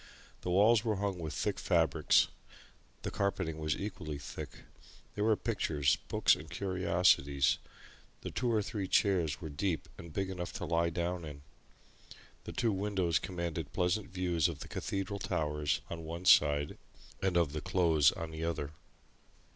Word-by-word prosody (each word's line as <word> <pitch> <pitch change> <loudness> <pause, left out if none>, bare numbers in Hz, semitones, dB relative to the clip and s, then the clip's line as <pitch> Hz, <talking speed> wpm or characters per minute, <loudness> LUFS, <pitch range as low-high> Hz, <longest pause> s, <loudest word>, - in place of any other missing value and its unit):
The - - -4
walls 105 +5 +5
were 110 -3 +1
hung 100 -2 -2
with 80 -2 -4
thick - - -1
fabrics; - - +3 0.8
the - - -3
carpeting 95 -5 -1
was 75 -1 -1
equally 80 -7 -5
thick; 70 - -8 0.5
there 105 - -1
were 110 0 +4
pictures, 80 - +1
books, - - +4
and 80 +1 -5
curiosities; 85 -7 +2 0.6
the - - -5
two 120 -1 0
or 110 -2 +2
three 100 -3 -3
chairs 85 - +2
were 80 - -5
deep 80 +3 -2
and 85 -1 -9
big 95 +4 -2
enough 90 -2 -5
to - - -4
lie 85 0 +2
down 85 +1 -2
in; 70 -2 -8 1.0
the - - -5
two 115 - +1
windows 95 -4 +1
commanded 85 -5 -4
pleasant 90 +3 0
views 90 -4 +1
of - - -6
the - - -7
Cathedral 100 +1 -3
towers 75 -5 -1
on 85 -1 -6
one 85 +3 -6
side 75 -4 +5 0.4
and 95 -2 +1
of 80 -4 +2
the 75 - -3
Close 80 -6 +4
on 85 -4 -6
the 80 +1 -5
other. 80 -3 -2
85 Hz, 160 wpm, -32 LUFS, 80-95 Hz, 1.0 s, walls